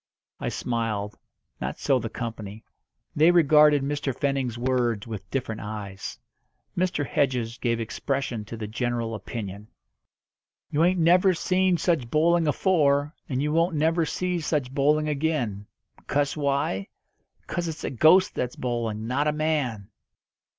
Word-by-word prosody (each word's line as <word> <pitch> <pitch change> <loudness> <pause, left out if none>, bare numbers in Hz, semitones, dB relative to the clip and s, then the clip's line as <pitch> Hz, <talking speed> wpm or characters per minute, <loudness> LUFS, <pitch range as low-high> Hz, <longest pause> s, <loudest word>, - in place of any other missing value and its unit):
I - - -2
smiled. 110 -4 -2 0.4
Not - - -4
so 135 -2 +2
the 115 -1 -4
company. 110 -2 -6 0.5
They 155 +3 +5
regarded 150 -4 +5
Mr. 145 -2 -2
Fenning's 135 -4 -1
words 120 -4 0
with 110 -4 -7
different 115 -5 -3
eyes. 105 -2 -6 0.6
Mr. 175 -5 0
Hedges 125 -4 -1
gave 115 -2 0
expression 120 0 -2
to 115 +2 -7
the 110 - -4
general 115 +1 -2
opinion. 105 -1 -6 1.0
"You 150 +2 +2
ain't 180 +2 +3
never 180 +3 +5
seen 185 +1 +2
such 165 -9 0
bowling 165 +3 +3
afore, 145 -2 +2 0.2
and 130 0 -1
you 150 - 0
won't 165 +1 +2
never 165 +3 +2
see 180 +1 -1
such 150 -5 -1
bowling 150 +2 +2
again. 140 -9 -1 0.4
'Cause 145 0 0
why? 140 -9 -1 0.6
'Cause 175 0 -3
it's 160 -1 -6
a - - -2
ghost 160 +9 +5
that's 125 0 -3
bowling, 115 -3 -3
not 140 +5 0
a - - +3
man!" 145 -9 -1
140 Hz, 140 wpm, -26 LUFS, 115-155 Hz, 1.0 s, They